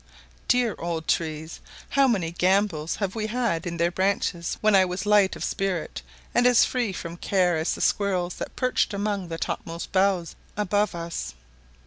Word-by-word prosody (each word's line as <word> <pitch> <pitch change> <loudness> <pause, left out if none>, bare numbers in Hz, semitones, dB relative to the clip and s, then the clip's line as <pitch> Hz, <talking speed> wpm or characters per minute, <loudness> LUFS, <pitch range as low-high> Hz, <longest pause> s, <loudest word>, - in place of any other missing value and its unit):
Dear 245 -3 +3
old 165 -2 -3
trees! 160 -1 -2 0.3
how 275 -1 +4
many 190 -9 0
gambols 180 -3 +1
have 195 -3 -2
we 215 -1 -2
had 215 -8 -1
in 170 -1 -4
their 170 +1 +2
branches 185 -2 -1
when 215 0 +3
I 190 - +7
was 180 0 -3
as - - -8
light 205 -2 +4
of - - -6
spirit 190 -5 -2 0.3
and 245 +1 +4
as 245 -2 +6
free 245 -5 -1
from 170 -2 -6
care 180 -2 +2
as 160 +1 0
the - - -7
squirrels 185 -3 +1
that - - -6
perched 250 -4 +1
among 200 -2 -2
the 165 -1 -5
topmost 165 +1 -4
boughs 190 -3 +1 0.2
above 205 -1 +1
us. 170 - -5
190 Hz, 175 wpm, -25 LUFS, 170-210 Hz, 0.3 s, I